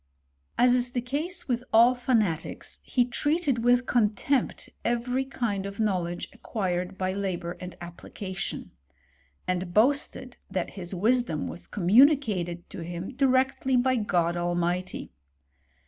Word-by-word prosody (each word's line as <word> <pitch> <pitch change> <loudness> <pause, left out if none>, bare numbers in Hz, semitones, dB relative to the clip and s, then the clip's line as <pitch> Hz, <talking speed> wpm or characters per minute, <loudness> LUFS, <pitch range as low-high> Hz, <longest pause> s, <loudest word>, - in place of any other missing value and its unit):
As 245 0 +5
is 250 0 0
the 245 - +1
case 295 +9 -3
with 245 -2 -1
all 235 +3 +7
fanatics, 220 -10 -1
he 245 -2 +1
treated 285 0 +1
with 245 +1 +4
con 215 -4 +2
tempt 275 +3 -1
every 245 +2 0
kind 220 -7 -2
of 200 +1 -9
knowledge 180 -5 -1
acquired 185 -2 -3
by 185 0 -1
labour 185 -3 -3
and 180 -1 -8
application; 185 +2 -6 0.8
and 180 -1 -2
boasted 255 +1 +2
that 185 -2 -2
his 185 -1 -6
wisdom 220 -4 +1
was - - -8
communicated 200 - +3
to - - -7
him 175 +6 -6
directly 265 0 +2
by 255 +1 +3
God 175 -6 +1
Almighty. 175 +1 -2
215 Hz, 130 wpm, -27 LUFS, 180-250 Hz, 0.8 s, all